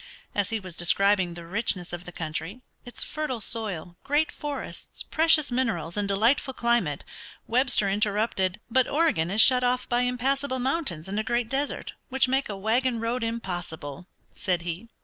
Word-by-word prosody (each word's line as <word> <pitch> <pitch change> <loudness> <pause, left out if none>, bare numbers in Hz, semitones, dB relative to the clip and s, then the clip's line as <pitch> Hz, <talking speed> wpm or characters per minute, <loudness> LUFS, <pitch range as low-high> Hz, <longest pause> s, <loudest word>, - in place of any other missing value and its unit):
As 205 -1 +1
he 225 -1 -1
was 185 -4 -6
describing 185 0 +3
the 170 -1 -8
richness 185 -2 -1
of 175 +1 -6
the 180 - -8
country, 165 +7 -5 0.2
its 245 - -4
fertile 305 -6 -3
soil, 195 -6 -4
great 295 +3 +1
forests, 290 -1 -6
precious 315 -3 +4
minerals, 225 -10 -1
and 205 -1 -1
delightful 235 +7 +2
climate, 235 -12 +1 0.4
Webster 250 -3 +3
interrupted. 205 -1 +1
"But 255 +2 +3
Oregon 280 - +2
is 210 +4 +5
shut 250 0 +6
off 250 0 +1
by 240 0 +2
impassable 260 +2 0
mountains 255 - 0
and 200 +2 -2
a - - 0
great 240 0 0
desert, 275 +2 -2 0.2
which 265 0 +2
make 265 0 +1
a 200 - -4
wagon 235 +4 +1
road 230 +2 -1
impossible," 175 -8 -4 0.3
said 180 -6 -1
he. 175 +7 -5
225 Hz, 165 wpm, -26 LUFS, 185-255 Hz, 0.4 s, shut